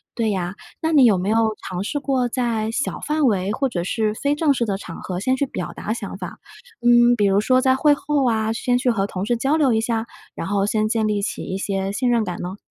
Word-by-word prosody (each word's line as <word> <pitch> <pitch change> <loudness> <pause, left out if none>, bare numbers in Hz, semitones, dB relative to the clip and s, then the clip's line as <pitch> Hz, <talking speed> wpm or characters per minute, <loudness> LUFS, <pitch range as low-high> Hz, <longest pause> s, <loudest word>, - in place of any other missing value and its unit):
对 230 -2 0
呀， 180 -2 -2 0.3
那 320 - 0
你 275 -4 +7
有 210 -5 +5
没 185 +3 -2
有 220 0 +2
尝 185 0 -3
试 290 +7 -2
过 265 -3 0
在 230 -3 -1
小 270 +4 -2
范 300 0 0
围， 200 -5 +1
或 270 +6 0
者 175 -7 -3
是 215 +3 0
非 285 +6 0
正 295 -1 +2
式 245 - -1
的 200 -3 -1
场 175 -4 -9
合 180 -1 -4
先 255 +7 +1
去 280 - 0
表 - - -5
达 - - -5
想 - - -6
法？ - - -7 0.5
嗯， 240 0 +6
比 210 -3 +1
如 200 +1 +3
说 255 +4 +3
在 260 0 +3
会 290 +2 +4
后 285 -3 0
啊， 220 -1 0
先 245 +2 0
去 250 0 +1
和 200 -3 0
同 190 -1 -4
事 240 +2 0
交 275 +6 +1
流 275 -6 +3
一 220 - +2
下， 225 -1 -1 0.3
然 165 - -4
后 200 0 +1
先 215 0 +1
建 220 -1 0
立 210 -1 0
起 - - -3
一 190 - -4
些 195 0 -2
信 245 +5 0
任 235 -2 +2
感 180 -4 -5
呢？ 185 +3 -5
225 Hz, 275 characters per minute, -22 LUFS, 200-255 Hz, 0.5 s, 你